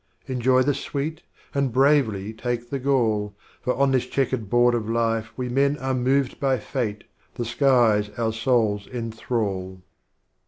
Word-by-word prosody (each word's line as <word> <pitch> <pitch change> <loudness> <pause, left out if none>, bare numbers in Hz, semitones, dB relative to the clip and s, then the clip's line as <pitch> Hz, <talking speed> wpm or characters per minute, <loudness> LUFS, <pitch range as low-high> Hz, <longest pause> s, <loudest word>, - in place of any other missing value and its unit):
Enjoy 130 0 +2
the 145 +2 +2
Sweet, 150 +4 -4 0.3
and 140 -3 0
bravely 120 -6 +2
take 120 +1 -4
the 140 - -1
Gall, 115 -6 +1 0.3
For 125 - 0
on 140 +1 +2
this 130 -2 +1
Checkered 130 -6 -1
Board 120 +1 +4
of 115 -2 -2
Life 115 -1 0
we 125 -1 -2
Men 140 +3 +2
Are 130 -1 -2
moved 130 +1 +1
by 135 -2 +2
Fate, 110 -2 -3 0.3
the 120 - -3
Skies 120 -5 +3
our 115 -1 0
Souls 110 -3 +1
enthrall. 110 -6 -3
120 Hz, 150 wpm, -24 LUFS, 110-135 Hz, 0.3 s, Board